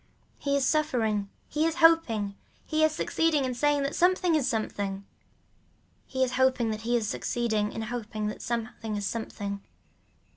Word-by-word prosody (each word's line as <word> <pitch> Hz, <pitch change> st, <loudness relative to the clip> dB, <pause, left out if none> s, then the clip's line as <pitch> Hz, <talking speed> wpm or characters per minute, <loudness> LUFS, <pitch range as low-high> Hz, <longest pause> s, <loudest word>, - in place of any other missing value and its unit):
He 280 Hz, -1 st, 0 dB
is 275 Hz, -, +1 dB
suffering, 230 Hz, -10 st, +1 dB, 0.2 s
he 305 Hz, -, 0 dB
is 325 Hz, 0 st, +1 dB
hoping, 325 Hz, -12 st, +4 dB, 0.3 s
he 315 Hz, 0 st, +1 dB
is 315 Hz, -, +5 dB
succeeding 310 Hz, -2 st, +1 dB
in 255 Hz, -, -1 dB
saying 290 Hz, +3 st, +2 dB
that 275 Hz, -, -2 dB
something 360 Hz, -1 st, +3 dB
is 295 Hz, -5 st, +2 dB
something. 200 Hz, -4 st, -2 dB, 1.0 s
He 260 Hz, 0 st, 0 dB
is 255 Hz, -, 0 dB
hoping 260 Hz, -3 st, +3 dB
that 215 Hz, 0 st, -4 dB
he 240 Hz, +2 st, 0 dB
is 220 Hz, -2 st, -1 dB
succeeding 220 Hz, -3 st, -1 dB
in 225 Hz, -, -4 dB
hoping 220 Hz, -2 st, -4 dB
that 210 Hz, -, -4 dB
something 230 Hz, -2 st, -3 dB
is 205 Hz, -1 st, -2 dB
something. 200 Hz, -2 st, -4 dB
240 Hz, 160 wpm, -28 LUFS, 215-295 Hz, 1.0 s, is